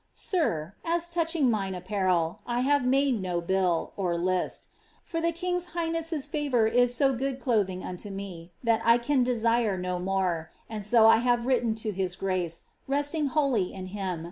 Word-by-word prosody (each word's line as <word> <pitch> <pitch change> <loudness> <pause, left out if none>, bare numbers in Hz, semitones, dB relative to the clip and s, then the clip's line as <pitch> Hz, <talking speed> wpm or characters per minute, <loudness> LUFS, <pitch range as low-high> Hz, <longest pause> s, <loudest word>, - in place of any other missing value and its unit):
*'Sir, 190 - -1
as 340 +1 -1
touching 325 -6 +2
mine 195 -3 -1
apparel, 180 -3 0
I 240 0 0
ha\'e 285 +2 +3
made 265 -2 +2
no 180 -2 -1
biU 180 -1 0 0.3
(list). 185 +1 -1 0.3
For 330 -1 -3
the 335 0 +2
kicgi 355 +1 -2
hishnesi>'s 330 -3 -1
fnvoiir 255 -7 +1
i.'* 245 0 +6
so 265 +3 +2
good 265 +1 -2
clothing 200 -8 0
unto 185 +3 -6
me, 190 -4 -7
that 230 -1 +2 0.3
lean 280 -3 +3
desire 230 -4 +1
no 180 0 -2
more: 180 -3 -1 0.2
aci 210 -2 -5
K 240 - +3
I 225 0 +8
have 240 0 +2
M - - -6
ritten 245 -4 +1
to 220 -1 -2
his 185 -2 -2
grace, 185 -4 -2 0.3
rc^ti^g 290 +2 +1
wholly 265 -11 +1
in 190 -1 -6
him. 190 -4 -3
225 Hz, 170 wpm, -27 LUFS, 185-280 Hz, 0.3 s, I